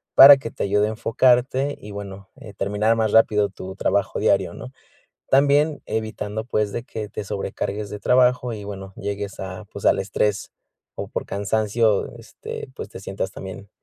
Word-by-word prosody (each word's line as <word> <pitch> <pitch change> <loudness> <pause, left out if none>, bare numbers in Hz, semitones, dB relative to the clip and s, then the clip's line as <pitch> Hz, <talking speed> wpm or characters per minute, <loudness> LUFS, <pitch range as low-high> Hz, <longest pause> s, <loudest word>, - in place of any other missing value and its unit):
para 140 +1 +11
que 125 -4 -6
te - - -5
ayude 105 +1 +2
a - - -2
enfocarte 130 +4 +2
y 105 - -10
bueno, 100 -1 -8
eh, 105 - -11
terminar 105 +3 +1
más 110 -2 +1
rápido 105 -2 +4
tu 95 -1 -9
trabajo 100 0 0
diario, - - +2
¿no? 60 - -9 0.6
También 145 +2 +3
evitando, 110 -1 -3
pues, 105 -3 0
de 115 - -4
que 110 -3 -6
te - - -5
sobrecargues 100 +1 -4
de 105 - -6
trabajo 125 +2 +3
y, 105 -2 -7
bueno, 95 -1 -8
llegues 100 0 -5
a, 95 +2 -6
pues, 100 - -8
al - - +4
estrés 100 +1 -1 0.4
o - - -5
por - - -4
cansancio, 105 +1 0
este, - - -8
pues, - - -7
te - - -9
sientas 95 0 -4
también 95 +1 -9
105 Hz, 175 wpm, -23 LUFS, 100-115 Hz, 0.6 s, para